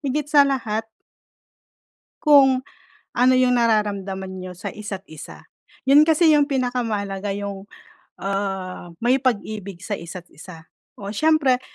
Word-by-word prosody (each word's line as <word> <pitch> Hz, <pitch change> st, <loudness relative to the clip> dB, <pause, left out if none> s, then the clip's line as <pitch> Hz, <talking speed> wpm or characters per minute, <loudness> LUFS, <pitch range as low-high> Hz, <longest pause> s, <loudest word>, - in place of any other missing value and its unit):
higit 285 Hz, 0 st, -2 dB
sa 295 Hz, -1 st, +5 dB
lahat 225 Hz, -4 st, -2 dB, 1.3 s
Kung, 270 Hz, -4 st, +5 dB, 0.5 s
ano 250 Hz, +2 st, +4 dB
yung 250 Hz, -1 st, +3 dB
nararamdaman 200 Hz, -4 st, 0 dB
niyo 185 Hz, 0 st, -7 dB
sa 180 Hz, -, -8 dB
isa't 205 Hz, -2 st, -7 dB
isa. 155 Hz, -, -11 dB, 0.4 s
Yun 290 Hz, +2 st, +7 dB
kasi 320 Hz, 0 st, +4 dB
yung 290 Hz, -, +4 dB
pinakamahalaga 215 Hz, -6 st, -2 dB
yung, 200 Hz, -1 st, -5 dB, 0.5 s
ah, 195 Hz, -2 st, -4 dB, 0.2 s
may 255 Hz, +3 st, +3 dB
pag-ibig 205 Hz, -7 st, -3 dB
sa 205 Hz, -2 st, -4 dB
isa't 175 Hz, +1 st, -8 dB
isa. 165 Hz, +1 st, -12 dB, 0.3 s
O, 200 Hz, 0 st, -7 dB
siyempre, 280 Hz, 0 st, +2 dB
215 Hz, 125 wpm, -22 LUFS, 195-260 Hz, 1.3 s, Yun